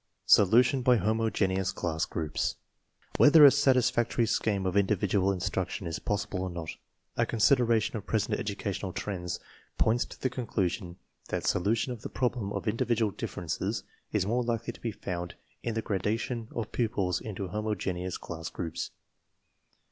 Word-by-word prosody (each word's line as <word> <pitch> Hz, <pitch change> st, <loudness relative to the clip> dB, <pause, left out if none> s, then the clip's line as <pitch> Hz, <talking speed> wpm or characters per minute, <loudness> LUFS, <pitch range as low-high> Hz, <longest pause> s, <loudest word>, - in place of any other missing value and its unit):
SOLUTION 120 Hz, +6 st, +5 dB
BY 125 Hz, 0 st, +5 dB
HOMOGENEOUS 105 Hz, -4 st, +1 dB
CLASS 80 Hz, -1 st, -1 dB
GROUPS 80 Hz, -2 st, -2 dB, 0.6 s
Whether 150 Hz, 0 st, +8 dB
a 140 Hz, -, +10 dB
satisfactory 125 Hz, -4 st, +3 dB
scheme 105 Hz, -3 st, 0 dB
of 95 Hz, 0 st, -1 dB
individual 100 Hz, -1 st, +2 dB
in 95 Hz, -, -3 dB
struction -, -, -2 dB
is 80 Hz, -1 st, -3 dB
possible 105 Hz, -2 st, -2 dB
or 95 Hz, -, -2 dB
not, 85 Hz, -2 st, -5 dB, 0.5 s
a -, -, +3 dB
consideration 115 Hz, -1 st, +3 dB
of 105 Hz, -, -5 dB
present 110 Hz, -2 st, 0 dB
educational 100 Hz, -4 st, -3 dB
trends 90 Hz, -4 st, -4 dB, 0.4 s
points 115 Hz, +2 st, +2 dB
to -, -, -12 dB
the 130 Hz, -, -1 dB
conclusion 95 Hz, -7 st, -2 dB, 0.3 s
that -, -, -2 dB
solu 100 Hz, +6 st, +2 dB
tion 125 Hz, +3 st, -1 dB
of 115 Hz, -, -10 dB
the -, -, -6 dB
problem 120 Hz, -5 st, -1 dB
of 110 Hz, -, -4 dB
individual 115 Hz, 0 st, +1 dB
differences 85 Hz, -2 st, -3 dB, 0.3 s
is -, -, +1 dB
more 120 Hz, +4 st, +1 dB
likely 115 Hz, 0 st, -2 dB
to -, -, -16 dB
be 115 Hz, -, -2 dB
found 90 Hz, -4 st, -5 dB, 0.3 s
in 115 Hz, -, -3 dB
the 110 Hz, -, -1 dB
gradation 110 Hz, +4 st, -2 dB
of 115 Hz, -2 st, -3 dB
pupils 95 Hz, -6 st, 0 dB
into 100 Hz, -3 st, -5 dB
homo 105 Hz, +3 st, -1 dB
geneous 90 Hz, -2 st, -3 dB
class 80 Hz, 0 st, -6 dB
groups. 85 Hz, -3 st, -4 dB
105 Hz, 155 wpm, -29 LUFS, 95-115 Hz, 0.6 s, a